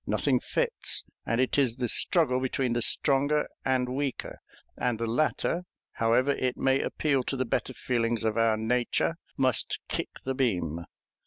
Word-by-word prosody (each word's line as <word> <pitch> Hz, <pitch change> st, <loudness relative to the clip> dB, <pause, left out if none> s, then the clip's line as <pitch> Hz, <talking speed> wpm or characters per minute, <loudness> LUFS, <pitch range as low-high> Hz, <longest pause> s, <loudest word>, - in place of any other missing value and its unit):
Nothing -, -, +2 dB
fits, 485 Hz, -1 st, 0 dB, 0.2 s
and 115 Hz, -, +1 dB
it 130 Hz, +2 st, +2 dB
is 125 Hz, -5 st, +2 dB
the 125 Hz, -1 st, -2 dB
struggle 130 Hz, +1 st, +3 dB
between 130 Hz, -1 st, -1 dB
the 120 Hz, -, 0 dB
stronger 145 Hz, +4 st, +3 dB, 0.2 s
and 130 Hz, -1 st, +1 dB
weaker; 135 Hz, +1 st, -3 dB, 0.4 s
and 125 Hz, -2 st, -1 dB
the 115 Hz, -, -2 dB
latter, 155 Hz, +8 st, 0 dB, 0.3 s
however 120 Hz, +4 st, +2 dB
it 130 Hz, -2 st, -1 dB
may 135 Hz, 0 st, +2 dB
appeal 140 Hz, -4 st, 0 dB
to 135 Hz, -, -2 dB
the 130 Hz, -, 0 dB
better 130 Hz, +2 st, -2 dB
feelings 115 Hz, -2 st, -1 dB
of 110 Hz, -1 st, 0 dB
our 115 Hz, -1 st, +3 dB
nature, 120 Hz, +8 st, 0 dB, 0.2 s
must 130 Hz, -2 st, +1 dB
kick -, -, -3 dB
the 135 Hz, -, -2 dB
beam. 90 Hz, -, -1 dB
130 Hz, 160 wpm, -28 LUFS, 115-135 Hz, 0.4 s, struggle